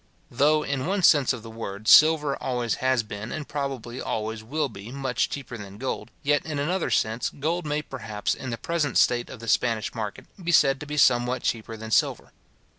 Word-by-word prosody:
Though, 150 +2 +3
in 140 0 -2
one 195 0 0
sense 145 -5 +5
of 125 -3 -5
the 115 - -9
word, 110 -2 -7
silver 150 -1 +6
always 120 -3 -1
has 130 -2 +2
been, 105 +1 -7
and 155 -2 -5
probably 135 -4 -4
always 110 0 -3
will 150 +6 -1
be, 105 -1 -10
much 135 -2 -1
cheaper 135 -3 -6
than 100 -1 -9
gold; 130 0 -4
yet, 145 0 +2
in 155 -2 -4
another 170 +6 0
sense, 110 +2 0
gold 160 +3 -2
may 150 +1 -1
perhaps, 110 -7 -3
in 130 - -6
the 115 - -3
present 150 +1 -1
state 120 -1 +3
of 125 - -9
the 115 - -8
Spanish 115 -1 +1
market, 105 -3 -5 0.2
be 170 - 0
said 135 -4 +4
to 150 - -8
be 150 0 -4
somewhat 125 -2 +3
cheaper 115 -1 -2
than 110 0 -8
silver. - - +1
130 Hz, 200 wpm, -25 LUFS, 115-145 Hz, 0.2 s, silver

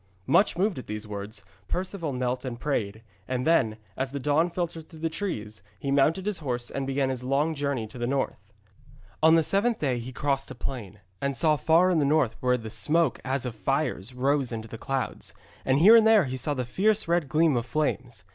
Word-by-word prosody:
Much 200 -4 +3
moved 190 -3 +1
at - - -10
these 105 0 -5
words, 100 0 -7 0.2
Perceval 180 -3 -3
knelt 125 -1 -2
and 125 -3 -5
prayed, 110 -6 -2 0.2
and 130 -1 -2
then, 125 -10 +3 0.2
as 130 0 -2
the 140 - -4
dawn 150 +5 +2
filtered 170 -2 -4
through 160 - -13
the 165 0 -1
trees, 110 - -4 0.2
he 140 - -3
mounted 155 +7 +2
his 210 -3 -1
horse 125 -5 -3
and 135 -1 -3
began 135 0 0
his 125 -1 -5
long 140 +5 +1
journey 140 -5 -2
to 110 +3 -11
the 120 - -1
north. 135 +1 -2 0.7
On 160 +1 +6
the 165 - +4
seventh 215 +7 +1
day 130 -5 0
he 120 +2 -7
crossed 135 +1 -1
a 130 - -8
plain, 105 -5 -6 0.2
and 140 -2 -1
saw 155 +4 +3
far 165 +6 +4
in 170 - +2
the - - +2
north 140 -5 +2
where 125 0 +2
the 110 -2 -8
smoke 150 +11 +1
as 135 0 -2
of 125 - -3
fires 135 -2 -1
rose 135 +1 0
into 110 -1 -5
the 115 0 -9
clouds, 135 0 -4 0.3
and 130 0 +2
here 200 +10 +8
and 225 -1 +6
there 220 -6 +6
he 130 0 -4
saw 145 +3 -2
the 125 -2 -2
fierce 210 - +1
red 170 -4 +1
gleam 155 -1 +3
of 120 0 -1
flames. 125 -6 -2
135 Hz, 215 wpm, -27 LUFS, 120-160 Hz, 0.7 s, here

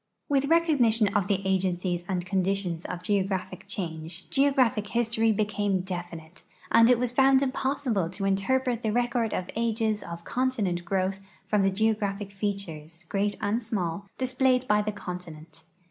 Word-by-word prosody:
With 280 -1 +2
recognition 250 - +3
of 200 -3 +2
the 195 -1 0
agencies 180 -2 0
and 180 -2 -1
conditions 185 -3 -1
of 175 - -5
geographic 190 -2 -1
change 165 -2 -5
geogra[)hic 265 -7 +2
history 225 -1 +2
became 205 -2 0
definite, 175 -2 -7 0.3
and 230 +1 +6
it 250 - +6
was 245 0 0
found 265 +1 +5
])ossilde 260 -8 -1
to 195 +1 -3
interpret 240 +5 +1
the 220 - 0
record 240 -1 0
of 180 - -3
ages 225 -2 0
of 170 0 -8
continent 210 -10 -1
growth 190 +1 -1 0.3
from 210 -1 +2
the 195 - +3
geographic 205 -1 0
features, 175 -5 -5
great 205 +1 0
and 220 +4 0
small, 200 -4 -3
displayed 255 0 +1
by 210 0 +4
the 210 0 -2
continent. 170 -5 -9
205 Hz, 145 wpm, -27 LUFS, 185-235 Hz, 0.3 s, and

